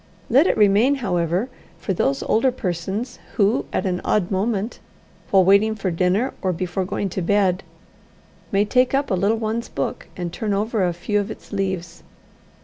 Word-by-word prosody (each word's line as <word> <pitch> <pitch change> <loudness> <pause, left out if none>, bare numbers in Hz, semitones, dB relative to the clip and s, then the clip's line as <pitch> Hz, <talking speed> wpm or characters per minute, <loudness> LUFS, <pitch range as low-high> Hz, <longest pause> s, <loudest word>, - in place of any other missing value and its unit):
Let 275 +9 +6
it - - +1
remain, 215 +7 +4
however, 180 - 0 0.3
for 195 - -2
those 140 -5 0
older 255 +4 +2
persons 195 +3 -4 0.2
who 210 +4 +2
at - - -1
an 180 -1 -1
odd 200 -3 +1
moment, 205 +3 -1 0.5
while 190 -2 +5
waiting 200 +3 +4
for 195 -3 -2
dinner, 185 +9 +1
or 185 - +1
before 185 +2 -2
going 195 +2 -2
to 185 - -3
bed, 190 0 +2 0.9
may 200 +1 +3
take 250 +5 +2
up 275 -3 0
a - - +3
little 200 +5 +2
one's 225 +1 -2
book, 135 - -4
and 175 -2 -4
turn 210 -2 -1
over 215 0 0
a 180 - +2
few 205 +5 -1
of 200 - -3
its - - -10
leaves. 190 -4 -3
200 Hz, 175 wpm, -22 LUFS, 180-220 Hz, 0.9 s, Let